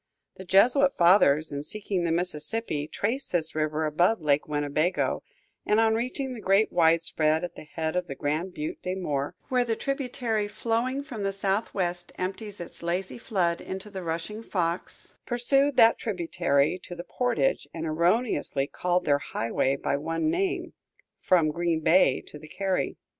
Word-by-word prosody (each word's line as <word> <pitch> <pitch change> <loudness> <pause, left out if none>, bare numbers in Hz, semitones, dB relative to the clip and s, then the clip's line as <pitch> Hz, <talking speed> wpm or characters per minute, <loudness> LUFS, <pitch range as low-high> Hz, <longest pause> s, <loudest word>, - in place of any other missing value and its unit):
The 190 - -9
Jesuit 250 +10 +4
fathers, 165 -4 +5
in 140 0 -3
seeking 195 +2 -1
the 165 - 0
Mississippi, 165 -1 +1
traced 240 - -2
this 165 -2 -1
river 155 0 -1
above 175 +8 +2
Lake 150 -2 +1
Winnebago, 150 +3 0 0.4
and 210 - +2
on 225 0 +4
reaching 255 +3 -2
the 240 - -7
great 195 +3 +3
widespread 160 -2 +2
at 175 -1 -4
the - - -11
head 160 +2 -3
of 180 -1 -1
the 135 - -6
Grand 155 +7 -2
Butte 150 -1 -5
des 185 +1 -3
Morts, 150 -3 -3
where 250 -2 +3
the 230 -2 -1
tributary 245 -5 -2
flowing 240 +6 -1
from 250 -7 -7
the 195 0 0
southwest 195 -3 -2
empties 200 +3 -5
its 175 - -9
lazy 175 +5 -3
flood 175 -7 0
into 190 +2 -7
the 190 -2 -5
rushing 170 +6 -4
Fox, 175 -5 -3
pursued 270 +3 +2
that 225 0 +6
tributary 175 -5 0
to 175 - -9
the 175 - -7
portage 245 +7 0
and 165 -1 -5
erroneously 170 - +1
called 180 +4 -1
their 145 -1 +3
highway 130 +1 -1
by 140 - -1
one 165 - -1
name, 370 +2 -1 0.5
from 165 -4 +3
Green 170 0 0
Bay 160 -5 +4
to 150 - -11
the 155 - -12
carry. 190 +3 -2
180 Hz, 165 wpm, -27 LUFS, 160-220 Hz, 0.5 s, that